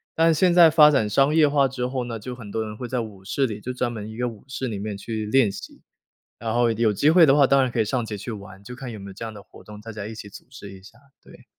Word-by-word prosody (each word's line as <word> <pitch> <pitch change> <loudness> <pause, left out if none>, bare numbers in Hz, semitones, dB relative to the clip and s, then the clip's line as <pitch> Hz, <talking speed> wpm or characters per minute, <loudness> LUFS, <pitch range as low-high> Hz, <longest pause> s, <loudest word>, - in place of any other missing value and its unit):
但 165 0 +4
现 180 +3 +3
在 170 -2 +7
发 150 -1 +7
展 125 -8 +1
商 140 +7 +2
业 155 -2 +6
化 140 -1 +3
之 125 -1 -4
后 125 -1 -3
呢， 115 -1 -5
就 125 +4 -7
很 115 -4 -10
多 110 - -2
人 105 -1 -8
会 125 - -6
在 125 0 -2
舞 105 -4 -9
室 135 +7 0
里 105 -3 -5
就 125 +4 -6
专 125 -1 -2
门 110 -2 -7
一 110 - -9
个 125 +1 -2
舞 115 +1 -14
室 130 -1 -4
里 105 - -5
面 105 0 -5
去 110 +1 -5
练 115 -1 +3
习。 100 - -11 0.6
然 115 -1 -3
后 120 0 +2
有 110 -1 +1
机 145 +9 +2
会 170 0 +7
的 140 -1 +4
话， 140 -2 +5
当 135 0 +4
然 130 - +1
可 120 -1 -1
以 - - 0
上 120 +1 -2
街 105 -1 -6
去 115 +4 -7
玩， 100 -2 -10
就 125 +4 -9
看 130 -1 -7
有 110 - -8
没 100 - -9
有 - - -10
这 110 +4 -7
样 110 - -7
的 100 - -12
活 - - -17
动， 105 0 -12
大 115 - -9
家 105 -1 -7
一 110 - -8
起 105 -1 -9
组 - - -13
织 105 -7 -11
一 95 - -13
下， 110 +4 -17 0.2
对。 - - -17
115 Hz, 340 characters per minute, -23 LUFS, 105-135 Hz, 0.6 s, 在